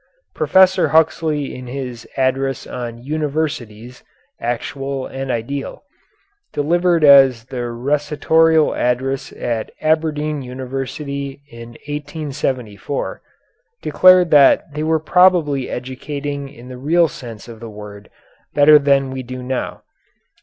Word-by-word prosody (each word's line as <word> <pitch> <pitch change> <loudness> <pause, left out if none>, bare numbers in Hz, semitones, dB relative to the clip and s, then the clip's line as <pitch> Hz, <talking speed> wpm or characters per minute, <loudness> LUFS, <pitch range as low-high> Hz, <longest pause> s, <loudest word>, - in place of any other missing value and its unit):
Professor 190 0 +4
Huxley 155 -2 +1
in 125 0 -9
his 125 -2 -6
address 135 0 0
on 120 -1 -7
"Universities, 140 -6 -4 0.4
Actual 135 +3 -3
and 135 0 -6
Ideal," 130 +4 -4 0.7
delivered 170 +2 +1
as 135 -5 +6
the 130 0 -8
Rectorial 150 +5 +2
Address 130 +2 -1
at 115 -2 -3
Aberdeen 155 -1 0
University 135 +2 -5
in 115 0 -11
1874, 145 -6 -4 0.6
declared 185 -2 +5
that 145 +1 +5
they 150 - -4
were 160 +1 +1
probably 160 -5 +3
educating 140 +2 -5
in 125 -3 -14
the 125 -1 -9
real 165 +5 +3
sense 120 -6 -10
of 115 -2 -11
the 115 0 -8
word 105 -1 -11 0.5
better 150 +1 +7
than 140 -2 +2
we 130 0 -4
do 130 0 -7
now. 130 0 -4
140 Hz, 110 wpm, -19 LUFS, 125-150 Hz, 0.7 s, better